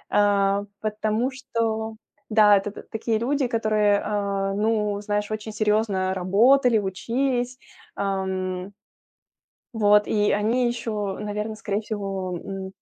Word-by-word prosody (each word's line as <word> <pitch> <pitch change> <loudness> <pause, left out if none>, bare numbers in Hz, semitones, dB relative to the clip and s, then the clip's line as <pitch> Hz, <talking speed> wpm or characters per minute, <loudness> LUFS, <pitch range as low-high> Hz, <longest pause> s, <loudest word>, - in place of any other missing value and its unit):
э, 200 -1 +3 0.2
потому 215 +4 -1
что 225 -4 -2 0.4
Да, 210 -1 +6
это 200 +1 -3
т - - -10
такие 225 0 -1
люди, 270 +2 0
которые, 215 -3 +2
э, 200 -1 -1
ну, 210 -1 0
знаешь, 210 0 -2
очень 215 0 -4
серьезно 210 -3 +1
работали, 225 +7 +4
учились, 245 +6 -1 0.4
ам. 190 -1 -2 1.0
Вот 210 -1 +4
и 210 -1 +2
они 235 +4 +2
ещё, 215 -5 -3
наверное, 210 +1 -3
скорее 210 0 -2
всего, 195 -4 -4
м, 195 +1 -6
210 Hz, 115 wpm, -24 LUFS, 200-225 Hz, 1.0 s, Да